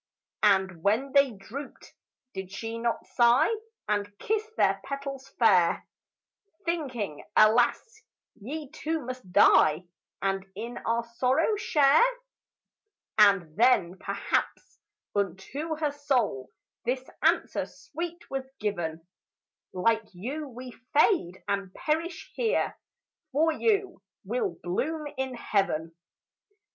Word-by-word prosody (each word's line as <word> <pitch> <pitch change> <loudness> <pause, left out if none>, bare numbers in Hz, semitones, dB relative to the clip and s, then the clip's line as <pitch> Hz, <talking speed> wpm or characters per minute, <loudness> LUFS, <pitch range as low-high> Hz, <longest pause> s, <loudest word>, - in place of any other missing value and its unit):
And 190 -4 +3
when 225 +9 +1
they 280 0 +5
drooped, 240 +6 -9 0.4
did 190 -1 -6
she 225 +4 -5
not 235 0 -1
sigh 240 - +4 0.4
And 205 -1 -1
kiss 430 0 0
their 195 0 +3
petals 275 -1 -6
fair, 185 -7 +4 0.8
Thinking, 260 - -3
"Alas, 240 - +4 0.3
ye 280 +6 -7
too 320 -2 -3
must 255 -7 -7
die 155 -1 +5 0.4
And 195 -1 -1
in 235 +4 -5
our 230 +1 +1
sorrow 255 - +1
share"? 300 -7 +4 1.2
And 195 -7 +5
then 200 -6 +3
perhaps - - -2 0.4
unto 200 - -2
her 305 -1 -1
soul 255 - 0 0.3
This 255 +2 -2
answer - - +2
sweet 340 +2 -7
was 265 -1 -4
given, 170 -6 -3 0.7
"Like 225 +4 +1
you 275 - -4
we 250 +1 -9 0.3
fade 295 - +3
and 200 -2 -1
perish 325 +2 -2
here; 455 -2 0 0.6
For 320 +4 +3
you 400 +1 0 0.2
we'll 455 -6 -2
bloom 300 - -2
in 265 -1 -3
heaven." 175 -8 0
240 Hz, 110 wpm, -28 LUFS, 195-295 Hz, 1.2 s, they